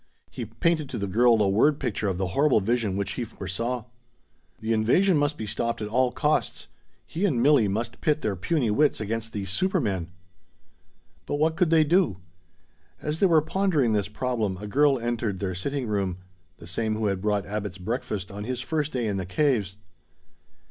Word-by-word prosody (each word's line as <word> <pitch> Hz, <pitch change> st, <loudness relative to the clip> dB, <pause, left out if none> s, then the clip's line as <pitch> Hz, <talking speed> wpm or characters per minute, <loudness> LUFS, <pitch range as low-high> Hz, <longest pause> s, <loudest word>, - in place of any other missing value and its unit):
He 115 Hz, +7 st, -5 dB
painted 150 Hz, +7 st, 0 dB
to -, -, -4 dB
the 100 Hz, -, -2 dB
girl 115 Hz, +4 st, +4 dB
a -, -, +2 dB
word 140 Hz, +10 st, +3 dB
picture 105 Hz, 0 st, -2 dB
of 95 Hz, -2 st, -1 dB
the 95 Hz, -1 st, -1 dB
horrible 140 Hz, +2 st, +3 dB
vision 110 Hz, -2 st, 0 dB
which 100 Hz, -, -1 dB
he 125 Hz, -, -3 dB
foresaw. 115 Hz, +3 st, -4 dB, 0.7 s
The 110 Hz, +1 st, -1 dB
invasion 165 Hz, -, +3 dB
must 145 Hz, +1 st, +1 dB
be 110 Hz, -, -4 dB
stopped 115 Hz, +3 st, -2 dB
at 105 Hz, -1 st, -4 dB
all 125 Hz, +2 st, +2 dB
costs! 150 Hz, +3 st, -1 dB, 0.4 s
He 165 Hz, -, -4 dB
and 160 Hz, -12 st, +2 dB
Milli 130 Hz, -5 st, +4 dB
must 115 Hz, +3 st, -3 dB
pit 155 Hz, 0 st, +1 dB
their 105 Hz, -2 st, 0 dB
puny 120 Hz, -, 0 dB
wits 145 Hz, +7 st, +2 dB
against 115 Hz, +1 st, -3 dB
these 100 Hz, -2 st, -3 dB
supermen! 105 Hz, -, 0 dB, 1.2 s
But -, -, -1 dB
what 160 Hz, +2 st, +1 dB
could 175 Hz, -1 st, +2 dB
they 160 Hz, -1 st, +5 dB
do? 160 Hz, -, +2 dB, 0.8 s
As 150 Hz, +1 st, -3 dB
they 195 Hz, -, +5 dB
were 160 Hz, -4 st, +4 dB
pondering 160 Hz, -, +1 dB
this 100 Hz, -2 st, +1 dB
problem, 110 Hz, -3 st, -2 dB
a 105 Hz, -, -8 dB
girl 140 Hz, +6 st, +3 dB
entered 115 Hz, -4 st, -2 dB
their 95 Hz, -2 st, -2 dB
sitting 135 Hz, +9 st, -3 dB
room 100 Hz, -4 st, -1 dB, 0.4 s
the 85 Hz, -, -12 dB
same 110 Hz, +6 st, -1 dB
who 110 Hz, 0 st, -2 dB
had 100 Hz, -2 st, 0 dB
brought 105 Hz, -1 st, 0 dB
Abbot's 100 Hz, -1 st, -4 dB
breakfast 105 Hz, -1 st, -4 dB
on 100 Hz, +1 st, -6 dB
his 125 Hz, 0 st, -3 dB
first 150 Hz, +3 st, -2 dB
day 125 Hz, -3 st, -1 dB
in 100 Hz, -2 st, -1 dB
the 95 Hz, -, -3 dB
caves. 105 Hz, -4 st, +1 dB
115 Hz, 190 wpm, -26 LUFS, 100-145 Hz, 1.2 s, they